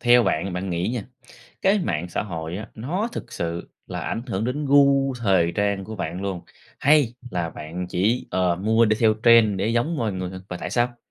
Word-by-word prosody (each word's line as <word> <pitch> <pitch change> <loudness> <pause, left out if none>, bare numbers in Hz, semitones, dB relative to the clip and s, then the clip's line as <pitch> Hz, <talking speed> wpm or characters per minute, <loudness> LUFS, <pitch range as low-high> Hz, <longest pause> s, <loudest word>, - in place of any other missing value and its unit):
Theo 120 0 +6
bạn 95 -1 0
bạn 90 +1 -3
nghĩ 85 +2 -1
nha, 120 -2 -2 0.6
cái 195 +2 +4
mạng 85 - -2
xã - - -2
hội 85 -3 -5
á, 105 - -6
nó 175 - -2
thực - - -7
sự 85 0 -4 0.2
là - - -5
ảnh 115 - -3
hưởng 100 -2 -2
đến 140 +5 -2
gu 140 -1 +4
thời 95 -6 +2
trang 100 -2 0
của 110 +1 -7
bạn 90 +1 -4
luôn 95 -3 -3 0.4
hay 145 -5 +4 0.2
là 85 -2 -2
bạn 85 +4 -6
chỉ, 105 +8 0
ờ, 90 -2 +1
mua 110 +4 +3
đi 110 0 +2
theo 110 -2 +5
trend 115 -4 +6
để 100 - 0
giống 120 +8 0
mọi 115 -6 -1
người? 95 -1 -4 0.2
Và 90 - -4
tại - - -5
sao? 120 0 0
105 Hz, 210 wpm, -24 LUFS, 90-120 Hz, 0.6 s, Theo